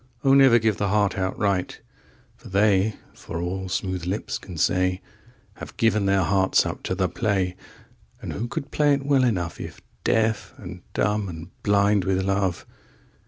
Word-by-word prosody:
8O 135 -1 +5
never 135 -4 +7
give 110 -3 +1
the 100 - 0
heart 100 0 +1
outright,9For 95 0 -4
they, 100 +1 +3 0.2
for 80 - -7
all 95 +2 -3
smooth 90 -2 -3
lips 100 +4 -3
can 90 -4 -10
say,10Have 90 +3 -3
given 110 -3 +2
their 95 -1 +3
hearts 95 +1 +3
up - - -4
to - - -2
the - - +1
play.11And 95 -4 -5
who 115 +4 -3
could 140 +4 -5
play 145 -1 +3
it 140 0 -5
well 140 -2 +3
enough12If 90 -9 -2 0.2
deaf 110 -1 0
and - - -9
dumb 105 -1 0
and 85 +1 -9
blind 100 -1 +2
with 95 0 +1
love? 95 -2 -1
100 Hz, 150 wpm, -24 LUFS, 95-110 Hz, 0.2 s, never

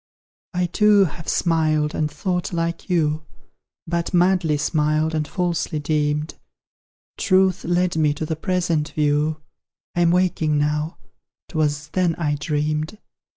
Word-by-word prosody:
I 180 0 +2
too 205 +3 +4
have 165 0 -7
smiled, 155 -3 +1
and 155 -1 0
thought 180 +5 -2
like 170 +1 -3
you, 155 -3 +1 0.6
But 170 +2 -2
madly 175 -3 +3
smiled, 155 +1 +1
and 155 -1 -1
falsely 175 -3 -1
deemed: 150 0 -1 0.9
TRUTH 185 0 +2
led 175 0 +1
me 155 -2 +3
to 155 - -3
the 160 - -2
present 170 -3 0
view, 150 +1 +1 0.5
I'm 175 -1 +3
waking 170 -4 +2
now 150 +2 -1 0.5
'twas 150 -2 -1
THEN 175 -1 +1
I 150 -3 -1
dreamed. 150 +4 -2
160 Hz, 125 wpm, -22 LUFS, 150-175 Hz, 0.9 s, too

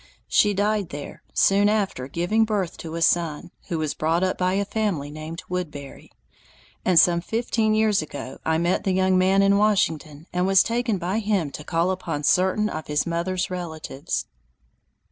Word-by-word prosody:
She 205 -1 +3
died 205 -1 0
there, 145 0 -8
soon 200 +1 +3
after 195 -12 -1
giving 175 +9 +1
birth 205 -6 -1
to 165 0 -7
a 165 - 0
son, 165 -1 +1 0.2
who 170 - -2
was 155 -2 -1
brought 165 +3 0
up 185 - +1
by 185 0 0
a 200 +1 0
family 195 -9 -2
named 155 +3 -7
Woodbury; 150 -6 -6 0.7
and 180 -3 +5
some 170 0 +4
fifteen 220 +1 0
years 215 -3 +3
ago 145 -3 -8
I 160 0 +1
met 175 +2 0
the 190 - 0
young 185 0 +2
man 190 +1 +4
in 200 0 +4
Washington 165 -8 0
and 180 +1 +1
was 195 -1 +5
taken 235 -2 -1
by 185 +4 -1
him 200 -9 0
to 150 - -8
call 170 +3 0
upon 165 -5 -4
certain 190 +6 +2
of 155 -6 -6
his 150 0 0
mother's 180 +2 -2
relatives. 160 -5 -4
180 Hz, 175 wpm, -24 LUFS, 160-200 Hz, 0.7 s, and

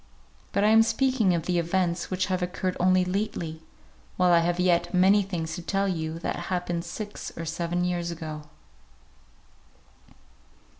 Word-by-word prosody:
But 200 - +1
I 210 - +5
am 225 +1 +7
speaking 230 -5 +2
of 165 -1 -3
the 180 -1 +1
events 170 0 0
which 185 0 0
have 185 -1 -1
occurred 180 +1 -2
only 185 0 +4
lately, 180 -4 -3 0.6
while 180 -1 +4
I 170 - +6
have 175 +1 0
yet 175 0 +2
many 195 +3 +5
things 175 -5 -4
to - - -6
tell 195 +3 0
you 160 -3 -2
that - - -2
happened 175 -2 -2
six 205 +4 -6
or 165 - -4
seven 170 +2 -2
years 175 -1 -1
ago. 155 -3 -6
180 Hz, 155 wpm, -26 LUFS, 170-190 Hz, 0.6 s, am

